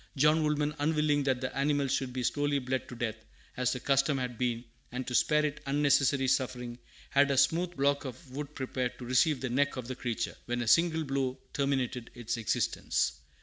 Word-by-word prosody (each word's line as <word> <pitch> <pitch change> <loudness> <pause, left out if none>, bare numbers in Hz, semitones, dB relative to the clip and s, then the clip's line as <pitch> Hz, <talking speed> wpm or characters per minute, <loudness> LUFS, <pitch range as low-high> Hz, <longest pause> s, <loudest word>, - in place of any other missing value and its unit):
John 150 +3 +4
Woolman, 150 -1 +1
unwilling 150 -1 +2
that 130 -2 +1
the 130 0 -3
animal 140 0 +1
should 135 -1 -1
be 125 0 -3
slowly 145 +3 +1
bled 130 -1 -2
to 125 - -7
death, 115 -2 -3 0.3
as 125 -1 +1
the 125 - -2
custom 135 +2 +2
had 125 -2 -3
been, 120 0 -1 0.3
and 125 +1 -4
to 125 - -5
spare 150 +4 +3
it 150 0 -3
unnecessary 140 -1 +3
suffering, 125 -2 -1 0.3
had 140 +1 +4
a 140 - +1
smooth 175 +5 +2
block 140 +1 +2
of 130 +2 -8
wood 145 +2 -6
prepared 130 -2 -3
to 125 - -8
receive 130 +3 +3
the 130 - -2
neck 140 +2 +1
of 125 -2 -5
the 130 - -4
creature, 120 -3 -3
when 120 0 -1
a - - -6
single 165 +4 +4
blow 135 -2 -1 0.2
terminated 130 -4 -1
its 120 -1 -3
existence. 110 -3 0
135 Hz, 195 wpm, -30 LUFS, 125-145 Hz, 0.3 s, John